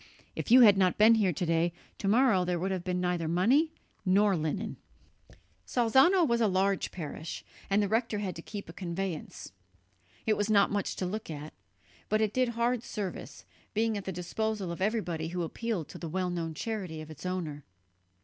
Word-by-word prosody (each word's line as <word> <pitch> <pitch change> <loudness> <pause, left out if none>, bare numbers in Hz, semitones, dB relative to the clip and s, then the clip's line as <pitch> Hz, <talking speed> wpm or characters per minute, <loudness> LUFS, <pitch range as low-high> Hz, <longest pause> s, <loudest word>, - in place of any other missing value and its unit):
"If - - -4
you 250 +3 +8
had 205 -4 +7
not 185 -2 +3
been 220 +2 +7
here 210 -5 +3
to 175 +2 -2
day, 165 +1 +2 0.3
to 195 - -2
morrow 220 -3 +4
there 180 0 -1
would 190 +3 -2
have 185 -2 -2
been 180 -1 -1
neither 180 -2 -1
money 240 - +3 0.3
nor 200 +1 +4
linen!" 175 +7 -3 0.9
Salzano 265 - +4
was 235 -1 +1
a 220 - +4
large 195 0 +1
parish, 160 -1 -6 0.2
and 200 +1 +3
the - - +1
rector 225 +1 0
had 195 -3 -3
to - - -7
keep 205 +3 -7
a 165 - -9
conveyance. 180 -2 -5 0.7
It 215 - +3
was 205 +1 0
not 200 -2 +4
much 205 -1 -1
to 185 - -2
look 210 +3 -4
at, 150 0 -7 0.6
but 215 - +2
it 215 -1 +1
did 255 -1 +2
hard 235 +1 0
service, 210 -5 -6 0.3
being 220 0 +1
at 200 - -5
the 190 - -3
disposal 195 +2 -3
of 170 - -6
everybody 180 -6 -1
who 175 +1 -3
appealed 200 -1 -3
to - - -9
the 165 - -5
well 180 +2 -1
known 165 -2 -3
charity 185 -6 -4
of 155 0 -10
its 155 - -11
owner. 170 -6 -3
195 Hz, 195 wpm, -30 LUFS, 175-220 Hz, 0.9 s, you